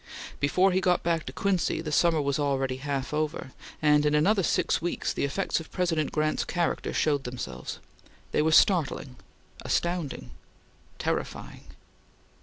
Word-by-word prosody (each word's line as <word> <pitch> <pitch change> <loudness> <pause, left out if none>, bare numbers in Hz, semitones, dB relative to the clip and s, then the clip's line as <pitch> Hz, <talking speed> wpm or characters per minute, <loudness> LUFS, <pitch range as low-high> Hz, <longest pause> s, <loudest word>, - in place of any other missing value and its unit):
Before 185 +7 +3
he 185 +1 +1
got 180 -2 +2
back 165 -2 0
to - - -4
Quincy, 195 -5 0
the 160 -2 -4
summer 165 +1 +3
was 140 +1 0
already 135 -2 0
half 140 0 -3
over, 150 -3 -2 0.3
and 150 -1 +5
in 150 0 +2
another 195 +7 +3
six 170 - +1
weeks 175 +1 -2
the - - -2
effects 170 +7 -1
of 165 - -11
President 165 -5 0
Grant's 155 0 0
character 175 -1 -1
showed 145 -3 +1
themselves. 125 -1 -6 0.5
They - - +2
were 160 +1 +2
startling 150 -7 +3 0.5
astounding 170 -5 -2 0.7
terrifying. - - -4
155 Hz, 145 wpm, -27 LUFS, 140-175 Hz, 0.7 s, and